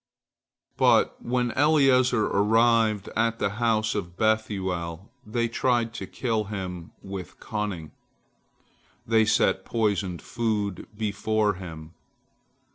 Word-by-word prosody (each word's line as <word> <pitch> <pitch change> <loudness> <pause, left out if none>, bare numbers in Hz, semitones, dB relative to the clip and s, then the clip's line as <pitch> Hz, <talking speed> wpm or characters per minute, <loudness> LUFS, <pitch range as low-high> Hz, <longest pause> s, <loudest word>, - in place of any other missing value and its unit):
" - - -67 0.3
But - - +3
when 125 0 0
Eliezer 130 -5 +4
arrived 110 0 +3
at 115 +1 +1
the 100 - 0
house 110 -2 +2
of 90 -4 -5
Bethuel, 95 -5 -1
they 115 +2 -1
tried 120 -1 0
to 95 - -6
kill 110 -2 -1
him 90 -4 -6
with 95 -2 -8
cunning. 100 -8 -4 1.1
They 110 -1 +3
set 95 -3 +2
poisoned 100 -6 -1
food 105 -5 -2
before 110 0 0
him. 80 -3 -9
110 Hz, 110 wpm, -26 LUFS, 95-115 Hz, 1.1 s, Eliezer